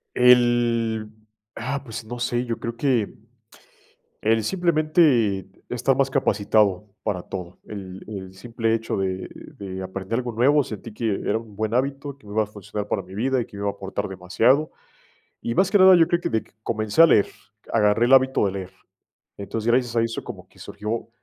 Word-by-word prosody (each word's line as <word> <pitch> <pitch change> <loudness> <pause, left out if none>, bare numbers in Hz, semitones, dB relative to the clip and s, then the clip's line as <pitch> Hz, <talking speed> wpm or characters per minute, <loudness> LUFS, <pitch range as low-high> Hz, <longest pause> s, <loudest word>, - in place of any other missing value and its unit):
El 120 -3 +3 0.4
ah, 135 +4 -3
pues, 115 -2 -7
no 120 +3 -7
sé, 120 +1 -1
yo 115 -2 -3
creo 115 0 -5
que, 120 -5 0 1.1
el 110 0 +2
simplemente 155 - +2 0.2
estar 125 +2 +1
más 135 0 +2
capacitado 105 -6 +1
para 100 -4 -2
todo, 90 -2 -7
el 95 -3 -8
el 95 -3 -7
simple 115 +3 -2
hecho 115 0 -2
de 95 -1 -2 0.3
de 95 -1 -6
aprender 95 +4 -4
algo 120 -2 -4
nuevo, 140 +6 +4
sentí 110 -1 -8
que 115 +1 -2
era - - +1
un 110 -2 -10
buen 110 +2 -2
hábito, 140 +2 -1
que 135 - -19
me 100 - -8
iba 110 0 +3
a - - -5
funcionar 105 0 -6
para 100 - 0
mi 95 +1 -12
vida, 130 +5 +1
y 120 - -2
que 115 - -15
me 100 - -6
iba 100 - 0
a - - -3
aportar 100 +1 -4
demasiado, 110 - +2 0.7
y 115 - -2
más 190 +5 +3
que 205 - +3
nada 190 0 +8
yo 165 -1 +4
creo 175 0 +1
que - - -1
de 110 - 0 0.2
comencé 110 +6 +2
a - - +10
leer, 105 - +4 0.4
agarré 110 +1 +3
el 130 - +6
hábito 130 -4 +4
de 95 - -1
leer, 95 -1 -6 0.7
entonces, 105 +3 -4
gracias 120 -1 +1
a 115 - +4
eso 115 0 -3
como - - -9
que - - -24
surgió, 110 +2 -5
115 Hz, 190 wpm, -23 LUFS, 100-125 Hz, 1.1 s, a